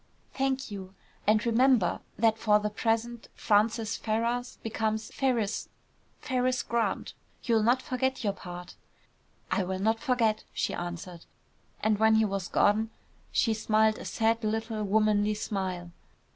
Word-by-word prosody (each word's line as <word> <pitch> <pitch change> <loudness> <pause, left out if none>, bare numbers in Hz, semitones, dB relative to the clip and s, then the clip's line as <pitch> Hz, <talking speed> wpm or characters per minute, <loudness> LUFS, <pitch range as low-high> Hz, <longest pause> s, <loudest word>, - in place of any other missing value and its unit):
"Thank 270 -2 -1
you. 190 -1 -8 0.3
And 215 +2 +4
remember, 235 -5 +3 0.2
that 225 0 +3
for 210 -1 +4
the 210 0 -2
present 230 +2 -1
Francis 220 +1 +2
Ferrars 235 +3 -1
becomes 220 -1 -2
Ferriss, 235 -6 0 0.5
Ferriss 255 0 0
Grant. 235 -1 -1 0.3
You'll 230 -3 +3
not 245 +4 +3
forget 260 0 -1
your 200 -2 +1
part!" 180 -1 -9 0.8
"I - - +2
will 190 +1 -3
not 220 +4 +1
forget," 235 -5 +1
she - - -1
answered. 175 0 -6 0.6
And 215 -1 +2
when 220 0 +5
he 220 0 +4
was 195 -3 -2
gone 215 +2 +2 0.4
she 225 - +2
smiled 220 0 +2
a - - -8
sad 225 +1 +1
little 220 0 -2
womanly 210 0 +2
smile. 185 -4 -3
220 Hz, 135 wpm, -29 LUFS, 205-230 Hz, 0.8 s, when